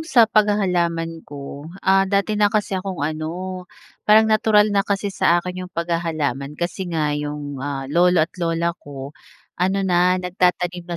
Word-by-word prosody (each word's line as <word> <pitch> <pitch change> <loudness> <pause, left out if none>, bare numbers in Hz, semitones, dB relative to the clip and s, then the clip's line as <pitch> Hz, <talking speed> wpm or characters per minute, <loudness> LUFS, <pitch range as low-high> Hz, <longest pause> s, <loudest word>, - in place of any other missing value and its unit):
'yong 320 - -8
sa 240 -7 +6
paghahalaman 180 -6 +1
ko, 145 +1 -8 0.2
ah, 195 0 +4
dati 200 +2 +1
na 205 -1 +5
kasi 210 -1 -1
akong 185 -6 -4
ano, 175 +4 -4 0.4
parang 215 +1 +7
natural 215 -1 +4
na 200 - +3
kasi 200 0 -1
sa 170 - +3
akin 180 +1 -6
'yong 180 - -19
paghahalaman. 155 -5 -2
Kasi 175 +2 -3
nga, 155 -3 0
'yong, 145 -1 -4
ah, 135 -1 -4
lolo 175 0 +4
at 165 - -17
lola 170 0 0
ko 140 0 -9 0.4
ano 190 +2 0
na 180 0 +3
nagtatanim 180 -1 0
na 175 - -3
175 Hz, 165 wpm, -21 LUFS, 155-195 Hz, 0.4 s, parang